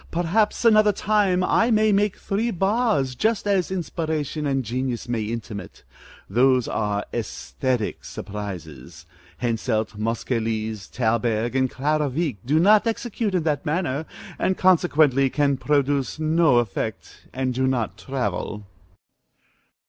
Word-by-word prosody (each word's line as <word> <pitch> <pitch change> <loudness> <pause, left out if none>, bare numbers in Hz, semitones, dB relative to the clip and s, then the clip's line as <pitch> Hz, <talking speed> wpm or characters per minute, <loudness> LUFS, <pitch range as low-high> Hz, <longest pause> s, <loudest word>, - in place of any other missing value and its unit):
Perhaps 185 +8 0
another 215 -2 +6
time 195 -3 +1
I 230 +5 +3
may 215 -1 +3
make 205 0 +1
three 215 +4 -1
bars, 195 - +1
just 220 - 0
as 195 -3 +1
inspiration 155 -4 -3
and 135 -2 0
genius 125 +1 -3
may 120 -2 -1
intimate. 105 -3 -6 0.4
Those 125 +3 +3
are 105 -1 -1
æsthetic 105 - -3
surprises. 85 -7 -8 0.4
Henselt, 110 -2 -1
Moscheles, 110 -2 -2
Thalberg, 115 0 0
and 130 -1 +2
Clara 150 +3 0
Wieck 145 -3 -2
do 150 +6 +2
not 210 +5 +5
execute 225 -3 -2
in 175 - +1
that 150 -3 0
manner, 160 -2 -1 0.3
and 185 - +1
consequently 155 -7 +4
can 140 0 +1
produce 140 0 0
no 155 -3 +3
effect, 110 -1 -3
and 130 0 -2
do 130 +1 0
not 125 -4 -1
travel. 105 -5 -3
135 Hz, 125 wpm, -23 LUFS, 115-180 Hz, 0.4 s, another